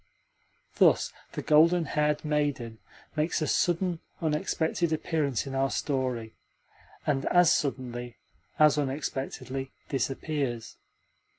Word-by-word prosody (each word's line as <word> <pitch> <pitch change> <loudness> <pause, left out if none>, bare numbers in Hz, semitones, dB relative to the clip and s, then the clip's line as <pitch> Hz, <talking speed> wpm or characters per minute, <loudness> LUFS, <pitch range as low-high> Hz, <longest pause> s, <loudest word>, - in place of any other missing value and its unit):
Thus - - +4 0.2
the - - -4
golden 165 +3 +5
haired 150 +1 0
maiden 145 -7 -1 0.4
makes 155 +2 +1
a 155 - 0
sudden, 175 +1 +1 0.2
unexpected 160 +1 0
appearance 155 -6 0
in 135 - -6
our 135 0 +1
story, 130 -7 -2 0.7
and 135 -2 0
as 175 -2 +5
suddenly, 125 -4 -3 0.4
as 150 -1 +5
unexpectedly, 135 -1 -3 0.2
disappears. 135 -3 -2
145 Hz, 100 wpm, -28 LUFS, 130-155 Hz, 0.7 s, golden